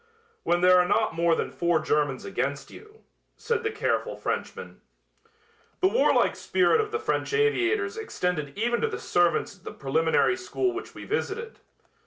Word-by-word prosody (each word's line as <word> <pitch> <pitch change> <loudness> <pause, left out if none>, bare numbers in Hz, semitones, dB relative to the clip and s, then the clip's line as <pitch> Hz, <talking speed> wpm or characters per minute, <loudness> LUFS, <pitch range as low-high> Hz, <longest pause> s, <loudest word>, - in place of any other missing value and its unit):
"When 175 0 +1
there 180 0 +6
are 180 - +3
not - - +1
more 165 0 +2
than - - -3
four 170 -2 +1
Germans 145 -4 0
against 140 +3 -3
you," 430 +1 -15 0.3
said 465 -1 -1
the 440 - -1
careful 435 0 -1
Frenchman. - - -5 1.0
The 375 - +4
warlike 475 - +3
spirit 375 +4 +2
of 425 - -4
the 445 - 0
French 445 0 -2
aviators 435 -1 +1
extended 180 - -3
even 235 +2 0
to - - +2
the - - -4
servants 175 +2 0
at - - -29
the - - -7
preliminary 160 - +1
school 375 0 -1
which 375 +2 -7
we - - -9
visited. 460 +1 -3
345 Hz, 165 wpm, -26 LUFS, -, 1.0 s, there